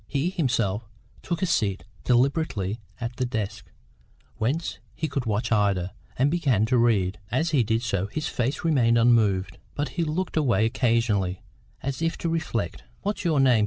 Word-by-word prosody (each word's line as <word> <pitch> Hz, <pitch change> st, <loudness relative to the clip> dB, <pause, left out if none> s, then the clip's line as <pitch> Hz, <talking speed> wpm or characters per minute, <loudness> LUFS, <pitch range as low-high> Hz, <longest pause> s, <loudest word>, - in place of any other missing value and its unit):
He 150 Hz, +5 st, 0 dB
himself 115 Hz, -, 0 dB, 0.3 s
took 170 Hz, 0 st, -2 dB
a -, -, +5 dB
seat 105 Hz, -, 0 dB, 0.2 s
deliberately 120 Hz, -, +1 dB, 0.2 s
at 120 Hz, +1 st, -5 dB
a -, -, +4 dB
desk, 110 Hz, -4 st, -4 dB, 0.7 s
whence 140 Hz, +10 st, -1 dB, 0.2 s
he 160 Hz, -, -2 dB
could 135 Hz, -5 st, -3 dB
watch 110 Hz, +2 st, 0 dB
Ida, 100 Hz, -4 st, +2 dB, 0.2 s
and 135 Hz, +3 st, +3 dB
began 135 Hz, -, +2 dB
to 125 Hz, +3 st, +2 dB
read. 100 Hz, -6 st, +2 dB
As 160 Hz, +7 st, 0 dB
he 145 Hz, -5 st, +4 dB
did 115 Hz, +1 st, 0 dB
so, 100 Hz, -5 st, 0 dB
his 150 Hz, +8 st, -3 dB
face 130 Hz, +7 st, -1 dB
remained 125 Hz, -8 st, +3 dB
unmoved, 110 Hz, -5 st, +3 dB, 0.2 s
but 145 Hz, 0 st, -1 dB
he 170 Hz, -, -1 dB
looked 165 Hz, +3 st, -2 dB
away 120 Hz, -9 st, +3 dB
occasionally, 115 Hz, -6 st, +1 dB, 0.4 s
as 135 Hz, +2 st, -3 dB
if 165 Hz, 0 st, 0 dB
to 170 Hz, -, -2 dB
reflect. 160 Hz, -, -2 dB, 0.2 s
"What's 205 Hz, +1 st, -2 dB
your 160 Hz, -5 st, +2 dB
name?" 130 Hz, -4 st, +5 dB
120 Hz, 165 wpm, -26 LUFS, 105-150 Hz, 0.7 s, a